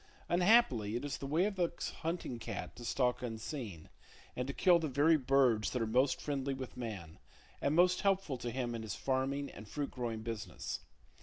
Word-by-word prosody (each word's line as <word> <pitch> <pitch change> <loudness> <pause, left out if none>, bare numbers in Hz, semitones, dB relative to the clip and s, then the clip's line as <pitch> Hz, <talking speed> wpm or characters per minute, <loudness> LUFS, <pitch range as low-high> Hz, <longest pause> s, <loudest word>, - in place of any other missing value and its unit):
Unhappily 175 - +4
it 120 - -2
is 145 - -3
the 135 - -4
way 160 +6 +3
of 205 -2 -2
the 175 -2 +2 0.3
hunting 165 -7 -3
cat - - -5
to 120 - -10
stalk 125 +1 +1
unseen, 115 - -5 0.5
and 125 +1 -2
to - - -1
kill 175 +1 +5
the 160 - -1
very 145 +4 +4
birds 130 -6 +3
that 125 - -2
are - - +1
most 125 +5 +2
friendly 140 -2 -2
with 130 -1 -7
man, 100 -10 -6 0.4
and 140 +2 +1
most 180 +1 +5
helpful 195 -7 +1
to 120 - -3
him 120 0 -2
in 115 - -4
his 110 -2 -4
farming 135 +1 -1
and 110 - -10
fruit 145 +5 -3
growing 115 -3 -3
business. 115 -3 -4
130 Hz, 195 wpm, -34 LUFS, 115-155 Hz, 0.5 s, kill